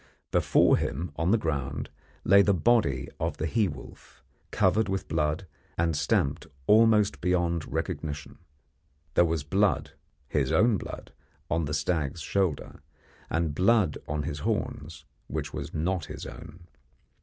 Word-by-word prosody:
Before - - +4
him 85 0 -3
on 80 +4 0
the 115 - +5
ground 75 - -3 0.3
lay 100 +2 +6
the 100 0 +3
body 90 - +2
of - - -2
the 80 - -2
he 105 +5 +2
wolf, - - -11 0.3
covered 110 -2 +2
with 95 0 -2
blood 75 +4 -1 0.3
and 85 -1 +1
stamped 70 -1 0 0.2
almost 105 0 +4
beyond 85 -2 0
recognition. 75 -2 -4 0.7
There 85 - +5
was 80 -3 -1
blood 100 +7 +1 0.4
his - - 0
own 115 -1 +4
blood - - -8 0.4
on 80 0 +1
the 75 0 -2
stag's 75 0 -1
shoulder, 90 -4 -1 0.5
and 80 -2 0
blood 95 -1 +3
on 75 0 -2
his 70 +1 -4
horns, 75 +1 -3 0.2
which - - -4
was 75 0 -5
not 85 +1 -1
his - - -7
own. 80 +2 -11
85 Hz, 140 wpm, -28 LUFS, 75-95 Hz, 0.7 s, lay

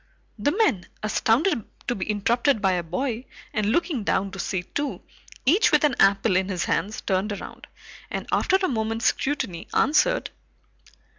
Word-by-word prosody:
The 255 +8 +2
men, 295 - +1 0.2
astounded 230 - +2 0.2
to - - +1
be 195 -2 -5
interrupted 230 +5 +2
by 195 -2 +2
a 180 -1 0
boy, 230 +9 -3 0.3
and 215 -2 0
looking 295 - 0
down 195 -1 0
to 195 - -8
see 175 0 -2
two, 290 +10 -4 0.4
each 370 - +4
with 300 0 +4
an 295 -2 +3
apple 195 -1 +4
in 190 +1 +1
his 180 -3 -1
hands, 210 +2 -1
turned 195 +2 0
around, 205 - -8 0.4
and - - -4
after - - +2
a 380 -1 +2
moment's 225 -3 -2
scrutiny, 245 - -1
answered. 315 - +2
220 Hz, 160 wpm, -25 LUFS, 195-285 Hz, 0.4 s, each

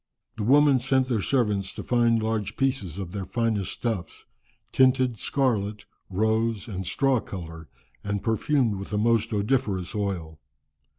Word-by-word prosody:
] - - -42
"The - - -4
women 140 +4 +5
sent 130 +1 +1
their 115 -5 +1
servants 105 -6 0
to - - -6
find 115 -2 +2
large 110 -2 -2
pieces 130 - -1
of 95 -3 -5
their 100 0 -4
finest 110 -2 -1
stuffs, 105 -8 -4 0.5
tinted 130 -3 +3
scarlet, 105 -7 0 0.2
rose, 110 +3 0
and 95 -4 -5
straw 135 +4 +2
colour, 80 -6 -8 0.3
and 100 -1 -3
perfumed 115 -1 +1
with 95 - -7
the 105 - -2
most 115 +1 +2
odoriferous 105 -4 0
oil. 90 -7 -3
110 Hz, 145 wpm, -26 LUFS, 100-125 Hz, 0.5 s, women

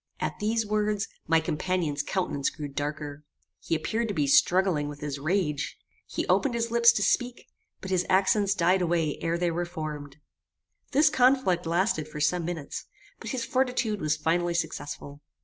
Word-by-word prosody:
At - - -3
these 220 +1 0
words, 210 -1 0 0.2
my 165 +1 +4
companion's 160 -2 -1
countenance 145 -4 -1
grew 150 -2 -6
darker. 145 +1 -5 0.4
He - - -1
appeared 225 +9 -1
to 205 - -3
be 150 -3 +2
struggling 170 +1 +3
with 145 -1 -8
his 145 -1 -4
rage. 150 -2 -1 0.3
He - - -3
opened 270 -4 +2
his 230 0 -1
lips 235 0 +6
to 205 - 0
speak, 245 +4 0 0.4
but 190 - -6
his 180 -1 +2
accents 195 +1 +3
died 180 +1 +3
away 165 -3 0
ere 165 +1 0
they 175 0 0
were 175 +1 -1
formed. 155 -5 -6 0.7
This 290 +2 +4
conflict 250 - +3
lasted 170 -2 +1
for 150 -1 -8
some 170 +3 +1
minutes, 165 -4 -5 0.3
but - - -7
his 255 -4 -2
fortitude 250 -5 0
was 155 0 +1
finally 170 +2 0
successful. 145 -3 -4
175 Hz, 165 wpm, -27 LUFS, 150-210 Hz, 0.7 s, lips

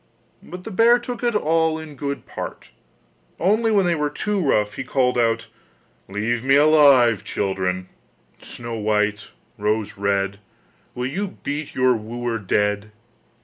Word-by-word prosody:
But 180 +1 -10
the 220 - -7
bear 230 +4 +5
took 245 0 -6
it 240 -2 +1
all 160 -3 +2
in 160 -2 -9
good 140 +1 -4
part, - - -7 0.7
only 215 +6 +2
when 200 -3 +3
they 175 - +2
were 150 -2 0
too 210 +7 -2
rough 105 -9 +1
he - - -5
called 125 -1 +1
out: 115 -1 +1 0.6
'Leave 110 +4 -1
me 135 +1 +4
alive, 140 -7 +5
children, 95 -2 -2 0.5
Snow 120 -1 -7
white, 105 0 0 0.3
Rose 105 0 -1
red, 100 0 -1 0.6
Will 125 - -3
you 190 +9 -4
beat 145 +1 -4
your 130 -1 +3
wooer 115 +1 -4
dead? 105 +1 0
125 Hz, 145 wpm, -22 LUFS, 105-160 Hz, 0.7 s, bear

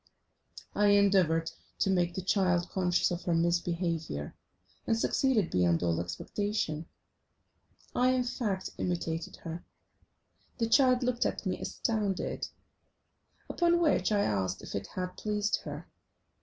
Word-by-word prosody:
I 205 - +3
endeavoured 190 -5 +4 0.3
to 195 - +2
make 175 -2 +1
the 190 - -3
child 180 -3 +2
conscious 180 -2 +1
of 175 0 -2
her 175 - +2
misbehaviour, 170 - -1 0.5
and 225 - +2
succeeded 225 -5 +2
beyond 90 -2 +2
all 85 -1 +1
expectation. 160 - -3 1.1
I, 250 +1 +4
in 255 -1 +2
fact, 210 -6 -2
imitated 170 -2 -2
her. 165 +1 -6 0.9
The 230 -3 +1
child 255 0 +5
looked 245 -1 +1
at - - -4
me - - -1
astounded, 210 -5 -2 1.0
upon 345 0 +2
which 300 - +2
I 205 -1 +3
asked 95 - -1
if - - -8
it 100 0 -3
had 180 0 -5
pleased 210 -1 0
her. - - -6
185 Hz, 130 wpm, -30 LUFS, 165-215 Hz, 1.1 s, child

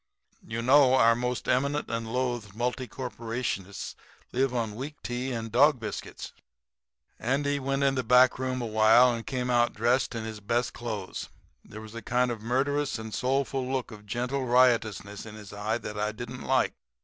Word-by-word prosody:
You 115 +1 -4
know 130 0 +6
our 115 -3 +6
most 125 +1 -2
eminent 140 +3 +1
and 115 -1 -3
loathed 120 -5 -2
multi 125 +2 -2
corruptionists 115 -5 -4 0.4
live 130 +1 +1
on 115 -4 -2
weak 135 +7 -6
tea 125 +2 -3
and 115 -2 -4
dog 135 +3 +5
biscuits.' 110 - -6 0.9
"Andy 140 +3 0
went 135 +1 -1
in 135 -1 +3
the 130 - 0
back 125 +2 +5
room 130 -1 -2
awhile 110 +3 +5
and 115 -1 -6
came 125 -1 -1
out 120 -1 +3
dressed 120 +3 +1
in 115 - -3
his 110 -1 -6
best 120 +3 -1
clothes. 110 -6 -5 0.3
There 110 - -10
was 110 0 -11
a 115 - -6
kind 125 +2 +1
of 115 -3 -5
murderous 135 +5 0
and 110 -1 -7
soulful 135 0 0
look 130 -2 -2
of 105 -1 -12
gentle 125 +5 -2
riotousness 115 -5 +2
in 105 - -9
his 105 -2 -11
eye 105 +2 -1
that 105 -2 -6
I 105 +1 0
didn't 120 +2 -7
like. - - +2
120 Hz, 175 wpm, -28 LUFS, 110-130 Hz, 0.9 s, know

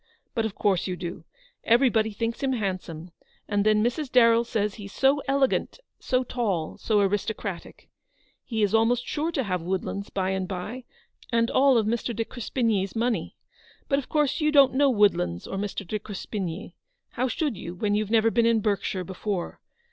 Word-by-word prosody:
" - - -48
But 225 -3 0
of 205 - -10
course 195 -3 +1
you 185 - -2
do; 175 0 -7 0.4
everybody 230 -2 +3
thinks 230 +3 -3
him 270 -1 +1
handsome; 185 -6 -4 0.4
and 205 -1 +1
then 215 0 +3
Mrs. 250 +4 -1
Darrell 230 -2 +5
says 210 -3 -1
he's 200 -2 -9
so 275 +2 +3
elegant, 275 - +1 0.2
so 255 -1 0
tall, 205 -11 -2
so 210 -2 +2
aristocratic. 200 -1 -3 0.6
He 220 -3 -1
is 205 0 +1
almost 235 +2 +3
sure 315 +2 -2
to 275 -5 -1
have 185 -5 -2
Woodlands 190 +3 -3
by 190 -1 -1
and 190 -1 -2
by, 205 +7 -5 0.5
and 230 0 +2
all 270 0 +5
Mr. 230 +2 -1
de 225 +1 -1
Crespigny's 225 -5 -1
money. 235 +1 -1 0.5
But 275 - +2
of 275 - -9
course 300 0 +1
you 305 0 +3
don't 280 -3 +6
know 280 +1 +4
'Woodlands 200 - +2
or 195 - -5
Mr. 200 0 -4
de 215 - -2
Crespigny. 200 -2 -5 0.4
How 255 +2 -1
should 275 +1 -1
you, 175 -1 -7
when 205 +3 0
you've 210 0 0
never 225 0 +3
been 235 0 +3
in 230 -1 +3
Berkshire 200 -3 -1
before 190 0 -4
220 Hz, 180 wpm, -26 LUFS, 195-245 Hz, 0.6 s, don't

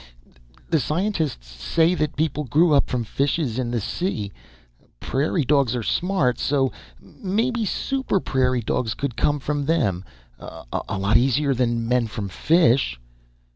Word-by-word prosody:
The - - +4
scientists 160 - -1
say 115 - +1
that 155 -4 -1
people 150 -1 -1
grew 155 +6 +3
up 140 - +3
from 125 -2 -1
fishes 135 +1 -1
in 125 -2 -1
the 120 -1 -1
sea. 105 - -3 0.7
Prairie 145 +2 0
dogs 135 -3 +2
are 120 - -2
smart. 175 - 0
So 135 -2 +1 0.3
maybe 225 - -2
super 265 0 -1
prairie 130 -5 0
dogs 110 +1 -1
could 140 -4 -3
come 145 0 +1
from 145 0 -2
them. 110 - +1 0.4
A 80 +10 -6
lot 100 +3 +3
easier 135 +3 +2
than 120 -2 0
men 125 -1 +2
from 105 -2 -5
fish...." 130 - +2
135 Hz, 140 wpm, -23 LUFS, 115-160 Hz, 0.7 s, The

